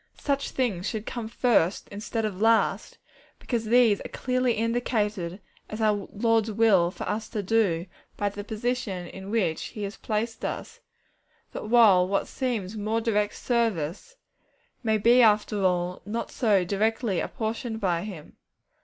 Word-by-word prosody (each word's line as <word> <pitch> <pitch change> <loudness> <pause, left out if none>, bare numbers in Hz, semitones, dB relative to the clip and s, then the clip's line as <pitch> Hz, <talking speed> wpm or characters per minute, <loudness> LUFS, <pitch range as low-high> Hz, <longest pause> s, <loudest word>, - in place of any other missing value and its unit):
Such 280 -1 -1
things 210 -8 -1
should 220 -2 -4
come 235 -3 -5
first 220 -6 +1
instead 220 +2 -3
of 200 -2 -4
last, 225 0 +2 0.4
because 235 -3 -3
these 230 -2 +4
are - - -7
clearly 255 -1 0
indicated 215 -5 -1 0.3
as 215 - -6
our 210 -3 +1
Lord's 225 0 +1
will 205 -5 +4
for 180 - -7
us 220 +1 -3
to 210 -3 -3
do, 190 -5 +1 0.3
by 205 - 0
the 205 +1 -7
position 220 -4 -3
in 190 +3 -9
which 205 -8 0
He 210 - -6
has 200 +1 -5
placed 225 +1 -3
us; - - -5 0.7
while 215 -5 +4
what 195 +1 0
seems 225 -7 -3
more 215 +2 -1
direct 210 -2 0
service, 230 - -1 0.7
may 220 -3 +2
be 235 +4 +5
after 210 -2 +3
all 180 -1 0
not 225 +3 -4
so 205 -6 +2
directly 210 +1 0
apportioned 225 -1 -3
by 175 -5 0
Him. 185 -8 -9
215 Hz, 145 wpm, -26 LUFS, 195-230 Hz, 0.7 s, be